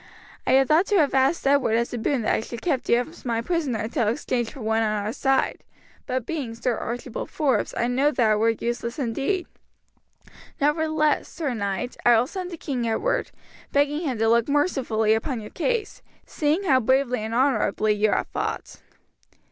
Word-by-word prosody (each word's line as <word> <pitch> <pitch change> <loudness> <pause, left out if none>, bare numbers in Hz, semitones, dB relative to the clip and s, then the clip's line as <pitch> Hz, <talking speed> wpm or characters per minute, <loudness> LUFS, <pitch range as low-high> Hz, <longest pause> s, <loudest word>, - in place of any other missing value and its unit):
I - - +3
had 270 0 +5
thought 325 +5 +4
to 415 - +1
have 295 -6 +3
asked 270 +5 +2
Edward 275 -5 +3
as 235 +1 0
a - - -2
boon 240 +2 0
that - - +1
I - - +1
should 230 - -10
have 235 - -5
kept 285 -8 -1
you 235 - +4
as 320 +7 -10
my 235 -2 -1
prisoner 290 -2 -1
until 225 +1 -1
exchanged 240 +1 -1
for 275 - -10
one 220 +1 +1
on 215 -1 0
our 215 - -2
side, 270 +1 0 0.4
but 255 -2 -2
being 275 -8 -4
Sir 235 +1 -1
Archibald 240 +2 -5
Forbes 290 -5 0
I 235 - +1
know 260 +4 +2
that 240 -7 +2
it - - +4
were 225 +2 +3
useless 235 +1 -3
indeed; 280 - -1 1.1
nevertheless, 305 +1 +1
sir 305 -6 -3
knight, 200 +2 -3
I 240 -1 +6
will 230 - +3
send 365 +5 -5
to 345 - -7
King 255 -6 -3
Edward, - - 0 0.4
begging 285 +1 +2
him 270 -8 -2
to 225 +1 +1
look 235 +3 +3
mercifully 255 -8 +1
upon 230 +3 -1
your 210 - -9
case, 460 +2 -2 0.2
seeing 310 +5 0
how 270 -9 +4
bravely 260 +1 +1
and 220 +1 -4
honourably 235 -5 +2
you 210 +1 +2
have - - +1
fought." - - -4
255 Hz, 195 wpm, -24 LUFS, 230-295 Hz, 1.1 s, I